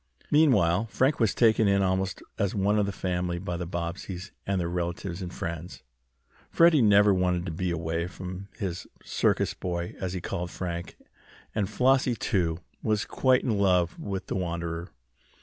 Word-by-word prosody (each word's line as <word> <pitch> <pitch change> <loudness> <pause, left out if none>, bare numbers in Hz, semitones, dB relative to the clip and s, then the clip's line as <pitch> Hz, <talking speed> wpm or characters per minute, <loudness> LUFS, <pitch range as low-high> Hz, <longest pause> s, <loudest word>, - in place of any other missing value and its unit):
Meanwhile 115 - +4
Frank 130 +8 +1
was 110 -5 +2
taken 110 -2 +4
in 100 0 +3
almost 95 0 -1 0.2
as 100 0 0
one 105 +1 +2
of 100 - +1
the - - -1
family 90 -2 -2
by 90 0 -4
the 85 0 -4
Bobbseys 90 +2 -5 0.2
and 100 -1 +1
their 85 - -1
relatives 85 +1 -3
and 90 -1 -5
friends. 85 +1 -6 0.7
Freddie 165 -4 +5
never 105 -2 +6
wanted 90 -1 +1
to 90 - -3
be 90 +3 -2
away 85 0 -2
from 95 +1 -7
his 95 -3 -4 0.2
"circus - - +1
boy," 85 -1 -4
as 95 -2 -3
he 95 - -2
called 85 +1 -4
Frank, 85 -2 -5 0.6
and 100 -3 0
Flossie, 130 +1 +3
too, 85 -7 0 0.2
was 105 -2 0
quite 130 -1 +2
in 110 -5 0
love 90 -3 +2
with 95 -2 -4
the - - -4
wanderer. 85 -1 -3
95 Hz, 165 wpm, -27 LUFS, 85-100 Hz, 0.7 s, never